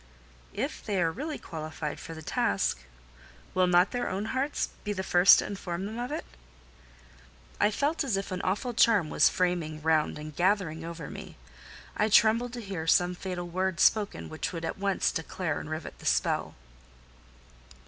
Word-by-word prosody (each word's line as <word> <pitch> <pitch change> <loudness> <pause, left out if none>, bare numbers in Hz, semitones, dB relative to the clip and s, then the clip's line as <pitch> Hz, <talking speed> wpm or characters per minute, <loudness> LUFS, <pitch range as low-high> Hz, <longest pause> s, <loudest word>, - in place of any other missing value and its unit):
"If - - -3
they 200 -3 -1
are 165 -2 +2
really 295 - -4
qualified 155 -2 -6
for 165 - -8
the 160 - -9
task, 100 - 0 0.7
will 185 0 +3
not 180 +1 +4
their 245 -1 -2
own 195 +3 -2
hearts 270 +3 -1
be 205 - -2
the 190 -1 -3
first 180 +1 +7
to - - 0
inform 190 -2 -4
them 220 +3 -5
of 245 +1 -3
it?" - - -3 1.3
I - - +4
felt 290 +9 0
as 240 -8 0
if 195 0 -4
an 185 - -2
awful 210 +7 -1
charm 215 -8 +4
was - - +5
framing 175 -4 -1
round 155 -2 +2
and 150 0 -8
gathering 175 -3 +1
over 165 -3 -6
me: - - -9 0.6
I 215 - +2
trembled 230 +3 +4
to 240 - -5
hear 190 -6 -5
some 175 +2 +4
fatal 180 -1 -5
word 185 0 -1
spoken 210 -2 +2
which 155 - -4
would 165 -2 -5
at 165 - -4
once 195 -1 +1
declare 160 0 -3
and - - -8
rivet 155 0 -6
the - - -6
spell. 60 0 +1
185 Hz, 175 wpm, -29 LUFS, 160-210 Hz, 1.3 s, first